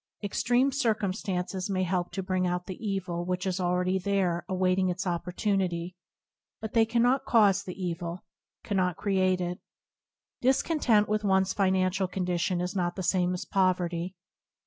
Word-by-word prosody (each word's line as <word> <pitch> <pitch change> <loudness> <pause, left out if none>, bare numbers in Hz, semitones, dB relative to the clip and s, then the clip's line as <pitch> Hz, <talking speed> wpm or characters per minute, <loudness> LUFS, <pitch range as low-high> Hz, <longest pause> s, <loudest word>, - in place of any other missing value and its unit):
Extreme 245 +6 +2
circumstances 200 -6 -1
may 185 -1 0
help 180 -1 -1
to 190 - -3
bring 185 0 0
out 180 0 -2
the 185 +3 -8
evil 185 -4 -2
which 180 +1 -2
is 190 0 -1
already 180 +1 +1
there 185 -3 0
awaiting 185 0 +2
its 185 +2 -3
opportunity, 180 0 -1 0.6
but 220 - -6
they 225 -1 +4
cannot 245 +4 +2
cause 205 -4 +4
the 185 -1 -8
evil, 175 -1 -4 0.4
cannot 185 -3 0
create 185 -2 +1
it. 180 0 -3 0.8
Discontent 250 -5 +3
with 215 0 0
one's 190 -1 +2
financial 190 -1 +1
condition 180 -1 -1
is 180 +2 -3
not 175 -2 -1
the 190 - -4
same 180 0 +1
as 180 - -5
poverty. 180 -2 0
185 Hz, 145 wpm, -28 LUFS, 180-200 Hz, 0.8 s, they